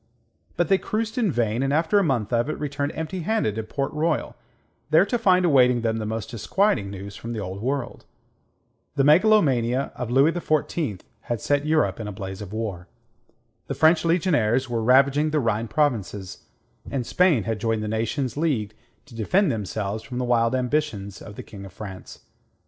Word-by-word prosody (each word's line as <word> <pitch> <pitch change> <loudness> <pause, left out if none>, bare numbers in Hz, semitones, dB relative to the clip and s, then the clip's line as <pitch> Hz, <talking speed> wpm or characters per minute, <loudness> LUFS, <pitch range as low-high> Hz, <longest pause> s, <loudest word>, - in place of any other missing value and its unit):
But 175 - +2
they 190 +2 +3
cruised 220 +2 -2
in 215 -7 +2
vain, 115 -2 0
and 135 0 0
after 160 +7 +3
a - - +2
month 125 - -1
of 120 +4 +1
it, 155 - -3
returned 145 0 -2
empty 160 +4 -4
handed 175 - 0
to 110 - -3
Port 135 +7 -3
Royal, 155 0 -1 0.5
there 160 +5 +5
to 240 - 0
find 185 -4 +4
awaiting 125 -6 +4
them 115 -1 0
the 110 -1 -3
most 115 +5 -4
disquieting 120 - 0
news 100 0 -8
from 115 +1 -6
the 110 - -4
Old 95 0 -5
World. 130 0 -3 0.9
The 140 - +2
megalomania 140 - +3
of 125 -2 -5
Louis 135 +6 +4
XIV 155 - -1 0.2
had 120 -2 -4
set 145 +6 0
Europe 155 -5 +1
in 110 - -5
a - - -4
blaze 95 0 -7
of 100 -2 -8
war. 105 -5 -4 0.8
The - - -3
French 160 +1 +4
legionaries 145 - +2
were 120 -2 -2
ravaging 140 +5 +4
the 155 0 +1
Rhine 115 -3 0
provinces, 110 -10 -2 0.4
and 130 -3 -2
Spain 170 - +3
had 110 0 -3
joined 110 0 -1
the - - -3
nations 115 +4 -2
leagued 135 -10 -1 0.3
to 140 - -17
defend 150 - +2
themselves 105 0 -3
from 125 0 -7
the 125 - -1
wild 115 0 +2
ambitions 125 -7 -2
of 105 - -10
the - - -8
King 100 -2 -11
of 95 -2 -11
France. 95 -3 -9
125 Hz, 185 wpm, -24 LUFS, 110-155 Hz, 0.9 s, there